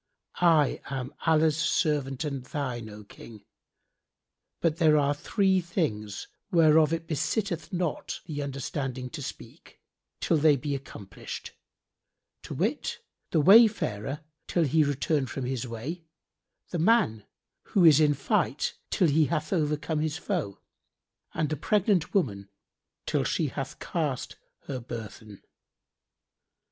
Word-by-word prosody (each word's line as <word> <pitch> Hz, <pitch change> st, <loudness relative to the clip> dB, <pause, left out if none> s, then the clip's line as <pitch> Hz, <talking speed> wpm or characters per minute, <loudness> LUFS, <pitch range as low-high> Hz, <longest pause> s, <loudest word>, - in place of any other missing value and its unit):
I 160 Hz, -5 st, +4 dB
am 135 Hz, 0 st, -5 dB
Allah's 160 Hz, -1 st, +4 dB
servant 145 Hz, -5 st, 0 dB
and 140 Hz, -4 st, -4 dB
thine, 125 Hz, -5 st, -4 dB
O 105 Hz, 0 st, -10 dB
King; 105 Hz, +1 st, -13 dB, 1.1 s
but 165 Hz, -2 st, +1 dB
there 155 Hz, -2 st, +5 dB
are 145 Hz, 0 st, +2 dB
three 190 Hz, +5 st, +1 dB
things[FN#64] 110 Hz, -, -3 dB, 0.3 s
whereof 160 Hz, -3 st, +5 dB
it 165 Hz, 0 st, -2 dB
besitteth 165 Hz, +2 st, -2 dB
not 175 Hz, -4 st, -2 dB
the 150 Hz, -3 st, -4 dB
understanding 135 Hz, -2 st, -4 dB
to -, -, -6 dB
speak, -, -, -10 dB, 0.4 s
till 165 Hz, -, +2 dB
they 150 Hz, 0 st, +5 dB
be 145 Hz, +2 st, -3 dB
accomplished; 110 Hz, -7 st, -7 dB, 0.9 s
to -, -, -7 dB
wit, -, -, -1 dB, 0.3 s
the 160 Hz, -, +2 dB
wayfarer, 160 Hz, -, +4 dB, 0.3 s
till 170 Hz, -, +1 dB
he 155 Hz, +2 st, +3 dB
return 145 Hz, 0 st, 0 dB
from 125 Hz, +2 st, -4 dB
his 130 Hz, -1 st, -3 dB
way, 135 Hz, +10 st, -6 dB, 0.7 s
the 175 Hz, -, -2 dB
man 165 Hz, -, +2 dB, 0.5 s
who 185 Hz, -4 st, +6 dB
is 155 Hz, -3 st, +8 dB
in 150 Hz, -2 st, +4 dB
fight, 135 Hz, -, 0 dB, 0.2 s
till 180 Hz, -, +3 dB
he 155 Hz, +1 st, +4 dB
have 155 Hz, +1 st, -2 dB
overcome 150 Hz, -1 st, 0 dB
his 155 Hz, +1 st, -1 dB
foe, 175 Hz, -, -3 dB, 0.8 s
and 155 Hz, -, 0 dB
the 155 Hz, -, -1 dB
pregnant 195 Hz, -, +1 dB
woman, 100 Hz, -, 0 dB, 0.6 s
till -, -, 0 dB
she -, -, 0 dB
have -, -, -5 dB
cast -, -, -3 dB, 0.3 s
her 135 Hz, -3 st, -5 dB
burthen." 110 Hz, -3 st, -9 dB
150 Hz, 130 wpm, -28 LUFS, 130-165 Hz, 1.1 s, is